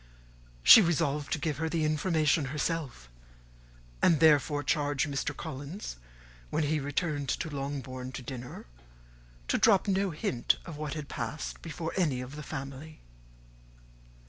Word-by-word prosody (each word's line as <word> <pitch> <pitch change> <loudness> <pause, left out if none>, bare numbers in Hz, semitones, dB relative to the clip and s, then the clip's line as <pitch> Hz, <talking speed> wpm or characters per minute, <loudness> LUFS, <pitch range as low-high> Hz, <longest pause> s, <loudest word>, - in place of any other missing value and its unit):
She 220 - +11
resolved 150 -5 0
to - - +1
give 150 -1 -2
her 160 +1 -1
the 160 -1 0
information 155 -1 +2
herself; 140 - -3 0.9
and 160 - +5
therefore 145 -2 +4
charged 145 0 +1
Mr. 140 -1 -3
Collins, 145 - -6 0.5
when 160 - 0
he 150 +1 +1
returned 145 0 -2
to 160 - -2
Longbourn 135 -2 -5
to 125 - -6
dinner, 125 0 -7 0.8
to - - +1
drop 210 -3 +4
no 195 0 +1
hint 130 -7 0
of 165 - -7
what 150 0 -4
had 150 -2 -5
passed 125 +5 -5
before 165 0 -5
any 150 -9 +1
of 125 +3 -7
the 150 - -6
family. 145 +1 -7
150 Hz, 140 wpm, -30 LUFS, 135-160 Hz, 0.9 s, She